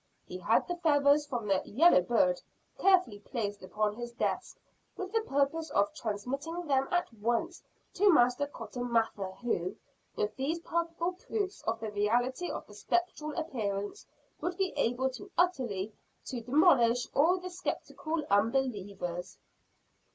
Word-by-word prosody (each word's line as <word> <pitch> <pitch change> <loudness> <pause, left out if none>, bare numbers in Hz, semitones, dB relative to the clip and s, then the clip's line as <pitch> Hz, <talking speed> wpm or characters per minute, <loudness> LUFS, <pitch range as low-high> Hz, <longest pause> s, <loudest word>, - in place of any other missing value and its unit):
He 180 - -7
had 210 +6 +2
the 350 - -2
feathers 290 -3 +4
from 240 -6 -3
the 195 -2 +2
"yellow 295 - +5
bird" 180 -3 +2 0.4
carefully 365 - +4
placed 205 -2 -4
upon 210 +3 -1
his 240 +2 -6
desk, - - -2 0.4
with 375 -1 -5
the 450 0 +2
purpose 315 -2 0
of 200 0 +2
transmitting 275 +11 -4
them 270 -2 +2
at 350 -8 0
once 235 - -1 0.3
to 400 +1 +5
Master 250 -1 +4
Cotton 245 -2 -6
Mather 225 -4 +1
who, 185 -7 -1 0.4
with 210 0 -1
these 285 +5 -1
palpable 335 +1 -1
proofs 390 +1 -3
of 225 0 0
the 220 -1 -4
reality 245 +10 +1
of - - -5
the - - -15
spectral 325 -4 -1
appearance 220 - -3 0.3
would 350 0 -3
be 385 -2 0
able 250 +3 +1 0.3
utterly 235 - +1 0.3
to 245 -3 -4
demolish 245 -3 +4
all 335 +6 +4
the 365 0 -7
skeptical 330 -3 -3
unbelievers. 200 -6 0
255 Hz, 140 wpm, -31 LUFS, 210-330 Hz, 0.4 s, yellow